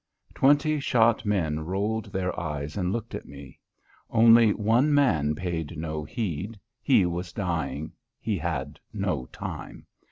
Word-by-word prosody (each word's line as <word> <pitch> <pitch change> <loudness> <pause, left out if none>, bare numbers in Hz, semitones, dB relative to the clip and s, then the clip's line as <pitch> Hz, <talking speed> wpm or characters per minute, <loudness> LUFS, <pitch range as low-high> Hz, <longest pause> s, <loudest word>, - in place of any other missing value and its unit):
Twenty 145 +2 +3
shot 115 -4 +2
men 80 -7 +1
rolled 100 +6 -2
their 90 -1 -2
eyes 75 -3 -4
and 90 -2 -1
looked 115 +1 -4
at - - -6
me. 70 -1 -12 0.5
Only 115 -1 +6
one 115 +8 +2
man 80 - +3
paid 85 -2 -4
no 80 -1 -3
heed. 105 - -4 0.2
He 110 -5 +4
was 90 +1 -3
dying; 80 -6 -3 0.3
he 105 -4 -2
had 75 -3 -3
no 65 - -2
time. - - -7
90 Hz, 135 wpm, -26 LUFS, 80-115 Hz, 0.5 s, Only